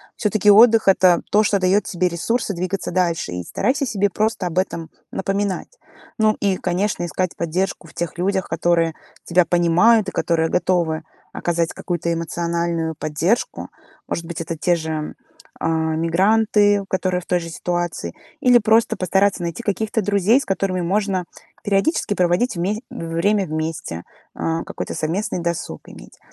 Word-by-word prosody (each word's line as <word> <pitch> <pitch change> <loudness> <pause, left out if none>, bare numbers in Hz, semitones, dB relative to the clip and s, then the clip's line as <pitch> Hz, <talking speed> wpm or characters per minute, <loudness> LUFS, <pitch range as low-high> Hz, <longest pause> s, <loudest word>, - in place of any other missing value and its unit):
Всё-таки 210 -1 +1
отдых- 220 +1 +7
это 185 -2 +5
то, 210 +1 +5
что 200 -1 +2
дает 190 +3 +3
тебе 180 0 0
ресурсы 205 +4 -1
двигаться 185 +2 -3
дальше. 170 - 0
И 90 0 -4
старайся 275 - 0
себе 205 -4 0
просто 210 -2 -1
об 175 +1 -6
этом 170 -3 -1 0.2
напоминать. 200 - -2 0.4
Ну 215 -1 +3
и, 195 -2 +1
конечно, 180 0 -1
искать 180 +2 -2
поддержку 170 +1 -2
в - - -16
тех 170 -1 -4
людях, 190 +1 0
которые 165 -1 +1 0.3
тебя 175 0 +3
понимают 180 +5 +4
и - - -8
которые 165 -1 0
готовы 170 -3 0 0.3
оказать 170 -1 -1
какую-то 170 -1 -3
эмоциональную 170 -1 -2
поддержку. 155 +9 -1 0.4
Может 170 - -3
быть, 165 -1 -5
это 165 0 -4
те 175 +3 +2
же, 160 -2 -4 0.5
а, - - -1
мигранты, 195 +6 +2
которые 185 -1 0
в - - -16
той 180 - +1
же 165 -1 -7
ситуации. 175 - -3 0.3
Или 250 -1 +6
просто 225 0 +3
постараться 190 0 +1
найти 170 +7 -4
каких-то 220 +1 -1
друзей, 205 +6 +3
с - - -7
которыми 190 -1 -1
можно 190 0 0 0.4
периодически 205 +5 +1
проводить 180 +6 +1
вме 205 +6 -1
время 195 -2 0
вместе, 155 - -4 0.3
э, 165 0 -1
какой-то - - -5
совместный 180 +5 -2
досуг 170 -1 -3
иметь. - - -14
180 Hz, 150 wpm, -21 LUFS, 170-205 Hz, 0.5 s, отдых